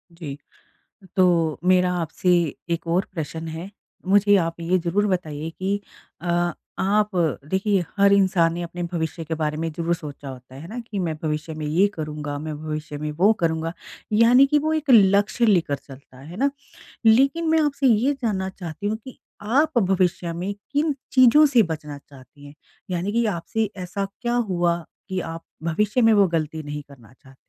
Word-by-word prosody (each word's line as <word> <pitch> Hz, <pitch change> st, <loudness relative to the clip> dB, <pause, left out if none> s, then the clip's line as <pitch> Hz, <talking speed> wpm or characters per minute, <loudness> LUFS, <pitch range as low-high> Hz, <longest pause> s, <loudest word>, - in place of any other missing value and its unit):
जी, 150 Hz, -5 st, -7 dB, 0.8 s
तो 170 Hz, -4 st, +3 dB
मेरा 180 Hz, -1 st, +3 dB
आपसे 170 Hz, +2 st, -1 dB, 0.4 s
एक 170 Hz, 0 st, -2 dB
और 190 Hz, -, +2 dB
प्रश्न 160 Hz, 0 st, -5 dB
है 165 Hz, +4 st, -6 dB, 0.4 s
मुझे 205 Hz, +1 st, +5 dB
आप 165 Hz, -2 st, -1 dB
ये 175 Hz, +2 st, +1 dB
ज़रूर 185 Hz, +4 st, 0 dB
बताइए 160 Hz, -5 st, -2 dB
कि 195 Hz, +4 st, -2 dB, 0.4 s
अ 175 Hz, 0 st, +1 dB, 0.3 s
आप 210 Hz, +2 st, +2 dB, 0.4 s
देखिए 190 Hz, -1 st, +1 dB
हर 200 Hz, 0 st, +5 dB
इंसान 185 Hz, -4 st, +3 dB
ने 175 Hz, -, -4 dB
अपने 175 Hz, +1 st, -6 dB
भविष्य 165 Hz, 0 st, -3 dB
के 160 Hz, +1 st, -3 dB
बारे 155 Hz, -1 st, -2 dB
में 165 Hz, +1 st, -2 dB
ज़रूर 170 Hz, +2 st, -1 dB
सोचा 145 Hz, -3 st, -9 dB
होता 130 Hz, -1 st, -11 dB
है। 135 Hz, -, -9 dB
है 165 Hz, -, -9 dB
ना? 230 Hz, +5 st, -6 dB
कि 225 Hz, -3 st, -6 dB
मैं 170 Hz, -4 st, -1 dB
भविष्य 155 Hz, 0 st, -3 dB
में 155 Hz, 0 st, -5 dB
ये 170 Hz, +7 st, +3 dB
करूँगा, 150 Hz, -2 st, -5 dB
मैं 155 Hz, +1 st, -5 dB
भविष्य 155 Hz, -1 st, -5 dB
में 150 Hz, +1 st, -3 dB
वो 185 Hz, +8 st, +4 dB
करूँगा 165 Hz, -1 st, 0 dB, 0.4 s
यानी 235 Hz, +5 st, +6 dB
कि 295 Hz, +2 st, +3 dB
वो 310 Hz, +2 st, 0 dB
एक 310 Hz, -2 st, -1 dB
लक्ष्य 205 Hz, +1 st, +5 dB
लेकर 175 Hz, -9 st, +3 dB
चलता 135 Hz, -2 st, -15 dB
है। 135 Hz, -, -13 dB
है 175 Hz, -, -9 dB
ना? 275 Hz, +6 st, +2 dB, 0.6 s
लेकिन 275 Hz, +9 st, +4 dB
मैं 320 Hz, 0 st, +4 dB
आपसे 285 Hz, -2 st, +1 dB
ये 245 Hz, +4 st, +3 dB
जानना 190 Hz, -4 st, -1 dB
चाहती 180 Hz, +1 st, -6 dB
हूँ 215 Hz, +1 st, -1 dB
कि, 250 Hz, +3 st, -12 dB, 0.2 s
आप 275 Hz, +8 st, +1 dB
भविष्य 185 Hz, -3 st, +1 dB
में 180 Hz, +4 st, -3 dB, 0.2 s
किन 295 Hz, +1 st, +1 dB, 0.2 s
चीज़ों 260 Hz, +4 st, +7 dB
से 265 Hz, -5 st, +4 dB
बचना 155 Hz, -4 st, -5 dB
चाहती 140 Hz, +1 st, -16 dB
हैं 145 Hz, -, -12 dB, 0.4 s
यानी 180 Hz, +3 st, -1 dB
कि 235 Hz, +2 st, +1 dB
आपसे 205 Hz, +6 st, -2 dB
ऐसा 195 Hz, +2 st, -4 dB, 0.2 s
क्या 240 Hz, 0 st, -1 dB
हुआ, 175 Hz, -7 st, +1 dB, 0.3 s
कि 190 Hz, -1 st, -1 dB
आप 165 Hz, -1 st, -6 dB, 0.2 s
भविष्य 210 Hz, +8 st, +1 dB
में 225 Hz, -1 st, +5 dB
वो 200 Hz, -2 st, +5 dB
गलती 160 Hz, -2 st, -2 dB
नहीं 150 Hz, 0 st, -5 dB
करना 125 Hz, -6 st, -17 dB
चाहती? 130 Hz, +1 st, -20 dB
175 Hz, 185 wpm, -23 LUFS, 160-210 Hz, 0.8 s, चीज़ों